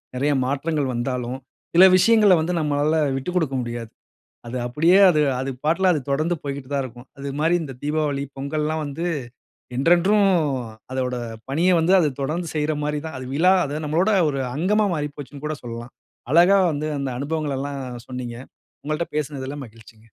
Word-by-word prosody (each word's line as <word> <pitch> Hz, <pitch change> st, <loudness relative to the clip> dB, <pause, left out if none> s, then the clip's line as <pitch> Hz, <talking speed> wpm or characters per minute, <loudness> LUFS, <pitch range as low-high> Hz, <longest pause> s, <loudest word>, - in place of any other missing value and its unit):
நெறய 145 Hz, +3 st, +1 dB
மாற்றங்கள் 140 Hz, 0 st, -1 dB
வந்தாலும், 125 Hz, +1 st, -2 dB, 0.4 s
சில 180 Hz, -, +8 dB
விஷயங்கள 210 Hz, -1 st, +5 dB
வந்து 175 Hz, +3 st, -1 dB
நம்மளால 150 Hz, +1 st, +1 dB, 0.2 s
விட்டுக்குடுக்க 160 Hz, -2 st, -1 dB
முடியாது. 120 Hz, -1 st, -6 dB, 0.6 s
அது 125 Hz, +2 st, -5 dB
அப்டியே 165 Hz, +9 st, +4 dB
அது 155 Hz, -2 st, +2 dB, 0.2 s
அது 135 Hz, +1 st, -2 dB
பாட்டுல 180 Hz, +4 st, +3 dB
அது 150 Hz, -, 0 dB
தொடர்ந்து 155 Hz, +5 st, +1 dB
போய்கிட்டு 140 Hz, -2 st, -5 dB
தான் 140 Hz, -1 st, +1 dB
இருக்கும். 120 Hz, +1 st, -10 dB
அது 140 Hz, 0 st, -5 dB
மாரி 165 Hz, +3 st, +3 dB
இந்த 135 Hz, -3 st, -6 dB
தீபாவளி, 145 Hz, -2 st, -1 dB
பொங்கல்லாம் 155 Hz, +3 st, -2 dB
வந்து 145 Hz, +5 st, -4 dB, 0.7 s
என்றென்றும், 175 Hz, +8 st, +4 dB, 0.7 s
அதோட 125 Hz, -1 st, -1 dB, 0.3 s
பணிய 170 Hz, +6 st, +2 dB
வந்து 175 Hz, +4 st, +3 dB
அது 155 Hz, -, +3 dB
தொடர்ந்து 165 Hz, +4 st, -2 dB
செய்யுற 155 Hz, 0 st, 0 dB
மாரி 150 Hz, 0 st, -1 dB
தான். 160 Hz, -, -6 dB
அது 130 Hz, -, -7 dB
விழா 180 Hz, +5 st, +5 dB
அது 150 Hz, +2 st, -4 dB
நம்மளோட 170 Hz, +8 st, +2 dB, 0.2 s
ஒரு 140 Hz, -1 st, -3 dB, 0.2 s
அங்கமா 210 Hz, +6 st, +2 dB
மாறி 150 Hz, -1 st, -2 dB
போச்சுன்னு 145 Hz, 0 st, -9 dB
கூட 155 Hz, -1 st, -2 dB
சொல்லலாம். 120 Hz, +1 st, -8 dB, 0.4 s
அழகா 175 Hz, +4 st, +6 dB
வந்து 150 Hz, +1 st, -3 dB
அந்த 140 Hz, -, -2 dB
அனுபவங்களலாம் 145 Hz, -2 st, -3 dB, 0.3 s
சொன்னீங்க. 125 Hz, -2 st, -5 dB, 0.5 s
உங்கள்ட்ட 155 Hz, +3 st, -2 dB
பேசுனதுல 140 Hz, -2 st, -3 dB
மகிழ்ச்சிங்க. 110 Hz, 0 st, -18 dB
150 Hz, 155 wpm, -23 LUFS, 135-165 Hz, 0.7 s, சில